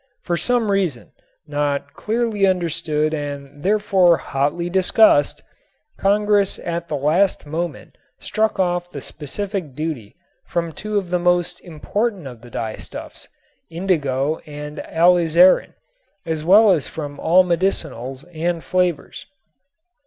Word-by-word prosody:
For 175 - -1
some 235 +2 +1
reason, 180 -11 -1 0.3
not 145 -1 -2
clearly 220 -3 0
understood 165 -4 0
and 145 -1 -6
therefore 190 -3 +3
hotly 145 +6 -1
discussed, 185 -4 +3 0.6
Congress 205 0 +2
at 170 0 -4
the 155 - -3
last 155 +8 +1
moment 165 +3 -5 0.2
struck 220 -2 -1
off 175 -1 0
the 145 - -7
specific 160 +2 -5
duty 150 -9 -5 0.3
from 170 -1 -3
two 210 +6 -4
of 185 -3 -3
the 180 - +1
most 175 0 +1
important 195 +3 -3
of 125 -4 -9
the 120 - -13
dyestuffs, 110 -2 -7 0.4
indigo 155 -5 0
and 150 0 -7
alizarin, 175 +1 +4 0.5
as 160 -2 -3
well 205 +5 +6
as 160 -7 +1
from 145 -2 -7
all 180 +3 +5
medicinals 160 -8 -2
and 170 +1 -2
flavors. 180 -5 -1
170 Hz, 120 wpm, -21 LUFS, 150-190 Hz, 0.6 s, well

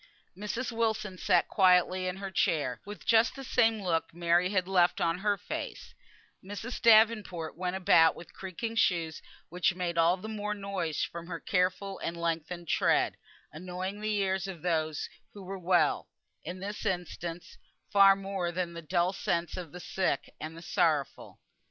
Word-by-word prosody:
Mrs. 210 +6 -3
Wilson 220 -4 -1
sat 175 -2 +3
quietly 185 -1 +3
in 180 - -2
her 195 0 -6
chair, 145 -8 0
with 205 0 -9
just 230 +1 +4
the 270 - -7
same 225 -4 +2
look 165 -3 0
Mary 175 +1 +2
had 185 -2 0
left 180 -2 +3
on 165 +1 +1
her 205 0 +1
face; 200 - -6 0.5
Mrs. 205 +6 -6
Davenport 215 -7 +4
went 180 0 -2
about 165 -3 +5
with 170 - -12
creaking 195 +5 -5
shoes, 165 -6 +1 0.3
which 180 +1 +1
made 175 -2 -2
all 170 +3 +4
the 200 +4 -8
more 210 -1 -3
noise 195 -6 -2
from 170 0 -6
her 170 -2 -5
careful 190 +1 -1
and 170 - -4
lengthened 170 +1 -3
tread, - - +2 0.4
annoying 185 +5 -5
the 215 0 0
ears 190 -1 0
of 180 -5 -8
those 155 -3 -1 0.3
who 200 - -9
were 190 +1 -6
well, 175 -4 +2 0.3
in 180 +3 -6
this 205 +2 -5
instance, 175 -3 -4 0.3
far 195 -1 +8
more 195 -3 -3
than 175 -1 -3
the 170 - -7
dulled 175 +4 0
senses 170 +1 -1
of 175 -5 -6
the 180 - -9
sick 180 -5 -2
and 160 +1 -7
the 165 - -10
sorrowful. 155 -7 0
185 Hz, 165 wpm, -30 LUFS, 170-200 Hz, 0.5 s, far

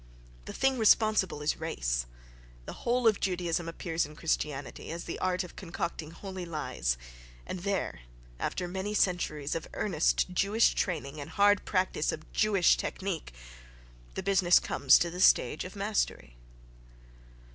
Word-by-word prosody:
The - - -7
thing 270 -1 +1
responsible 215 -7 +3
is 150 - 0
race. - - -2 0.6
The - - -6
whole 245 0 +1
of 215 - +4
Judaism 175 -2 -1
appears 165 0 -2
in 150 +1 -7
Christianity 150 -3 -3
as 170 +1 -5
the 170 - -6
art 185 0 0
of 180 - -11
concocting 170 -3 -5
holy 185 +2 -7
lies, 150 - -2 0.5
and 185 - -5
there, 195 - -2 0.4
after 180 - -2
many 190 +4 -3
centuries 155 -7 0
of 165 - -4
earnest 180 -1 +1
Jewish 205 +5 +3
training 155 -5 -2
and 140 - -7
hard 205 0 +3
practice 185 -5 0
of 155 - -9
Jewish 205 -5 +4
technic, 190 - -4 0.8
the - - -3
business 185 -2 +5
comes 135 -2 +4
to 170 - 0
the 180 +1 -5
stage 150 -3 +4
of 185 - -9
mastery. 195 - -2
180 Hz, 145 wpm, -30 LUFS, 155-195 Hz, 0.8 s, business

